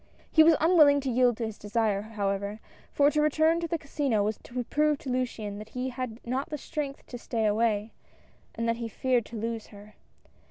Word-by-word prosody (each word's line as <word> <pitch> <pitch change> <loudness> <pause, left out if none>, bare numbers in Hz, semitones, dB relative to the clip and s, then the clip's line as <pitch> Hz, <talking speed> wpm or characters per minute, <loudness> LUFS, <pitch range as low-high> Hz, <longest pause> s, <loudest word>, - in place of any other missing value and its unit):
He 315 - +6
was 325 0 +6
unwilling 305 -4 +6
to 265 -1 -2
yield 245 -1 +3
to 230 - -2
this 220 -1 -7
desire 210 -1 0
however, 205 -1 -3 0.3
for 285 0 +4
to 300 - +1
return 315 +2 +3
to 340 - -2
the 335 - -1
Casino 280 -7 0
was 210 +1 -2
to 250 0 -5
prove 300 +4 +1
to 270 - -6
Luciane 225 -5 -3
that 215 +1 -9
he 255 +1 -1
had 250 -3 -5
not 260 +5 -2
the 300 - -3
strength 285 -1 -5
to 245 - -8
stay 225 -2 -2
away, 215 0 +1 0.6
and 230 +1 -2
that 230 0 +1
he 235 -1 -4
feared 245 +1 0
to 230 - -8
lose 225 0 -4
her. 205 0 -14
240 Hz, 205 wpm, -28 LUFS, 215-285 Hz, 0.6 s, He